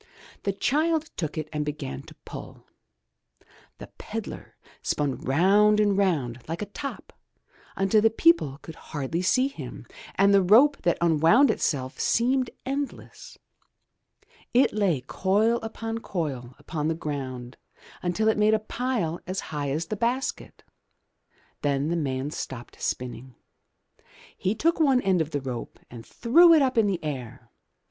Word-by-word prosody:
The 200 Hz, -, +2 dB
child 310 Hz, -, 0 dB
took 155 Hz, -3 st, -4 dB
it 155 Hz, -1 st, -3 dB
and 150 Hz, 0 st, -1 dB
began 145 Hz, -, -5 dB
to -, -, -15 dB
pull. -, -, -9 dB, 1.1 s
The -, -, -9 dB
pedlar -, -, -7 dB, 0.2 s
spun 145 Hz, -3 st, -1 dB
round 200 Hz, +9 st, +3 dB
and 205 Hz, -2 st, +3 dB
round 150 Hz, -12 st, 0 dB
like 165 Hz, +5 st, -3 dB
a 205 Hz, -, -11 dB
top 275 Hz, -, -7 dB, 0.6 s
until 195 Hz, +2 st, +3 dB
the 225 Hz, -, +5 dB
people 225 Hz, -, +3 dB
could 160 Hz, -, -8 dB
hardly 150 Hz, +3 st, -4 dB
see 255 Hz, +8 st, +3 dB
him, 280 Hz, -, -9 dB, 0.3 s
and 200 Hz, +1 st, +4 dB
the 200 Hz, -, +6 dB
rope 240 Hz, +10 st, +6 dB
that 175 Hz, -1 st, +1 dB
unwound 170 Hz, -, +5 dB
itself 130 Hz, -3 st, -2 dB
seemed 255 Hz, +2 st, +2 dB, 0.2 s
endless. 285 Hz, -, -5 dB, 1.2 s
It 255 Hz, -, +4 dB
lay 195 Hz, -10 st, +1 dB
coil 205 Hz, -, +1 dB
upon 225 Hz, 0 st, -5 dB
coil 135 Hz, -, -4 dB
upon 150 Hz, +1 st, -4 dB
the 160 Hz, -, 0 dB
ground 130 Hz, -5 st, -5 dB, 0.4 s
until 180 Hz, +5 st, 0 dB
it 220 Hz, -1 st, +2 dB
made 215 Hz, +1 st, +4 dB
a -, -, 0 dB
pile 215 Hz, -7 st, -2 dB
as 185 Hz, +1 st, -2 dB
high 145 Hz, -2 st, -2 dB
as 155 Hz, +4 st, -1 dB
the 215 Hz, -, -4 dB
basket. 245 Hz, +5 st, -2 dB, 1.0 s
Then 140 Hz, +1 st, 0 dB
the 170 Hz, -, 0 dB
man 140 Hz, -3 st, -2 dB
stopped 125 Hz, -5 st, -7 dB
spinning. 125 Hz, 0 st, -4 dB, 1.0 s
He 195 Hz, +4 st, -1 dB
took 335 Hz, +9 st, +1 dB
one 270 Hz, -5 st, +4 dB
end 190 Hz, -3 st, +2 dB
of 155 Hz, -, -2 dB
the 145 Hz, -3 st, -3 dB
rope 125 Hz, -3 st, -6 dB
and 120 Hz, -2 st, -9 dB
threw 335 Hz, -, +5 dB
it 310 Hz, -, +5 dB
up 260 Hz, -1 st, 0 dB
in 225 Hz, -3 st, +4 dB
the 185 Hz, -4 st, -2 dB
air. 130 Hz, -7 st, -6 dB
185 Hz, 150 wpm, -26 LUFS, 145-225 Hz, 1.2 s, the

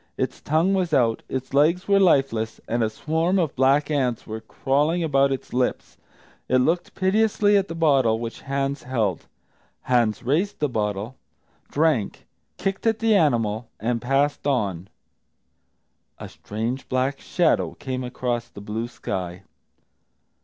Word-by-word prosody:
Its -, -, -3 dB
tongue 165 Hz, +6 st, +2 dB
was 180 Hz, -4 st, +1 dB
out, 115 Hz, -3 st, +2 dB
its 130 Hz, 0 st, -4 dB
legs 160 Hz, +6 st, +3 dB
were 200 Hz, -1 st, +4 dB
lifeless, 135 Hz, -, +2 dB
and 120 Hz, 0 st, 0 dB
a 110 Hz, -, +1 dB
swarm 160 Hz, -, 0 dB
of 165 Hz, -6 st, 0 dB
black 135 Hz, +3 st, +3 dB
ants 130 Hz, -5 st, 0 dB
were 110 Hz, +1 st, -6 dB
crawling 145 Hz, +9 st, 0 dB
about 140 Hz, -3 st, +3 dB
its 135 Hz, -, -5 dB
lips. 125 Hz, 0 st, -1 dB, 0.5 s
It 130 Hz, -, +4 dB
looked 165 Hz, +7 st, 0 dB
piteously 205 Hz, +1 st, +2 dB
at 195 Hz, -1 st, +2 dB
the 165 Hz, -, -6 dB
bottle 135 Hz, -9 st, +3 dB
which 115 Hz, 0 st, -6 dB
Hans 140 Hz, 0 st, -2 dB
held. 110 Hz, -9 st, -2 dB, 0.5 s
Hans 120 Hz, -3 st, +1 dB
raised 160 Hz, -, 0 dB
the 150 Hz, -, 0 dB
bottle, 105 Hz, +1 st, -3 dB, 0.5 s
drank, 150 Hz, -9 st, 0 dB, 0.3 s
kicked 195 Hz, +3 st, -2 dB
at 225 Hz, -1 st, +2 dB
the 225 Hz, 0 st, +2 dB
animal, 115 Hz, -, +1 dB
and 115 Hz, +2 st, -1 dB
passed 140 Hz, +3 st, 0 dB
on. 100 Hz, -10 st, -1 dB, 1.3 s
A -, -, -8 dB
strange 115 Hz, +5 st, -5 dB
black 130 Hz, +2 st, 0 dB
shadow 175 Hz, -2 st, +1 dB
came 130 Hz, -1 st, -4 dB
across 125 Hz, -1 st, -3 dB
the -, -, -11 dB
blue 110 Hz, +3 st, -4 dB
sky. 90 Hz, -5 st, -5 dB
135 Hz, 145 wpm, -24 LUFS, 115-160 Hz, 1.3 s, were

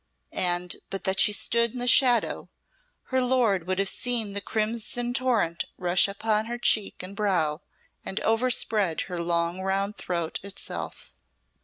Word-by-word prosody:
And 175 Hz, -1 st, 0 dB
but 195 Hz, -, -5 dB
that 190 Hz, 0 st, 0 dB
she 210 Hz, -, +6 dB
stood 235 Hz, +2 st, +1 dB
in -, -, -7 dB
the 245 Hz, 0 st, -2 dB
shadow, 245 Hz, -1 st, +4 dB, 0.6 s
her 260 Hz, -, +3 dB
lord 235 Hz, -9 st, +1 dB
would 185 Hz, 0 st, -1 dB
have 195 Hz, 0 st, 0 dB
seen 230 Hz, -2 st, +1 dB
the 200 Hz, -, -3 dB
crimson 230 Hz, +3 st, -3 dB
torrent 240 Hz, -10 st, 0 dB
rush 180 Hz, +2 st, +3 dB
up 200 Hz, +1 st, -10 dB
her 225 Hz, +2 st, 0 dB
cheek 215 Hz, -5 st, +2 dB
and 190 Hz, +2 st, -8 dB
brow, 175 Hz, -7 st, 0 dB, 0.4 s
and 190 Hz, -, -3 dB
overspread 220 Hz, -6 st, +1 dB
her 180 Hz, -2 st, -5 dB
long 170 Hz, +1 st, -1 dB
round 195 Hz, +2 st, -1 dB
throat 170 Hz, -3 st, -3 dB
itself. 200 Hz, 0 st, -6 dB
200 Hz, 150 wpm, -26 LUFS, 180-235 Hz, 0.6 s, she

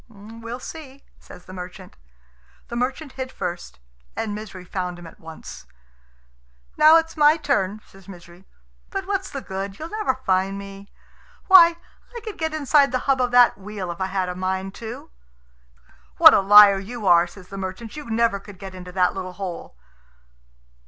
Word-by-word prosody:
"We'll 230 Hz, +3 st, -9 dB
see," 280 Hz, -1 st, -10 dB, 0.2 s
says 180 Hz, -, -15 dB
the 185 Hz, -, -12 dB
merchant. 180 Hz, 0 st, -10 dB, 0.7 s
The 235 Hz, -, -6 dB
merchant 260 Hz, +4 st, -3 dB
hid 260 Hz, -1 st, -6 dB
first, 175 Hz, -, -6 dB, 0.4 s
and 215 Hz, -2 st, -3 dB
Misery 205 Hz, -3 st, -8 dB
found 180 Hz, -1 st, -4 dB
him 175 Hz, -, -12 dB
at 165 Hz, -, -14 dB
once. 160 Hz, -1 st, -11 dB, 1.1 s
"Now 310 Hz, +2 st, +7 dB
it's 325 Hz, 0 st, -2 dB
my 300 Hz, 0 st, +5 dB
turn," 215 Hz, -, -1 dB
says 195 Hz, -1 st, -19 dB
Misery; 175 Hz, 0 st, -14 dB, 0.4 s
"but 390 Hz, -1 st, -4 dB
what's 390 Hz, -1 st, -2 dB
the 275 Hz, -, -6 dB
good? 195 Hz, +1 st, -6 dB
You'll 320 Hz, +2 st, -8 dB
never 425 Hz, -11 st, -1 dB
find 195 Hz, -5 st, -1 dB
me. 200 Hz, 0 st, -11 dB, 0.5 s
Why, 340 Hz, -3 st, +7 dB, 0.4 s
I -, -, -4 dB
could 430 Hz, -2 st, -8 dB
get 320 Hz, 0 st, -1 dB
inside 290 Hz, -2 st, +3 dB
the 255 Hz, -, +1 dB
hub 270 Hz, -2 st, +2 dB
of 250 Hz, -, +1 dB
that 245 Hz, -4 st, +5 dB
wheel 195 Hz, -2 st, -6 dB
if 170 Hz, -, -9 dB
I 190 Hz, -, 0 dB
had 190 Hz, -1 st, -2 dB
a 180 Hz, -, -3 dB
mind 190 Hz, +1 st, -3 dB
to." 225 Hz, -, -8 dB, 1.1 s
"What -, -, +9 dB
a -, -, +5 dB
liar 200 Hz, 0 st, +8 dB
you 220 Hz, +3 st, -8 dB
are!" 175 Hz, -1 st, +5 dB
says 180 Hz, 0 st, -15 dB
the 195 Hz, -, -8 dB
merchant; 195 Hz, +4 st, -7 dB
"you 295 Hz, -5 st, -9 dB
never 225 Hz, -2 st, +1 dB
could 200 Hz, -1 st, -14 dB
get 195 Hz, 0 st, -9 dB
into 180 Hz, -1 st, -10 dB
that 180 Hz, -1 st, +2 dB
little 185 Hz, -1 st, -6 dB
hole." 180 Hz, -, -7 dB
200 Hz, 175 wpm, -22 LUFS, 185-260 Hz, 1.1 s, What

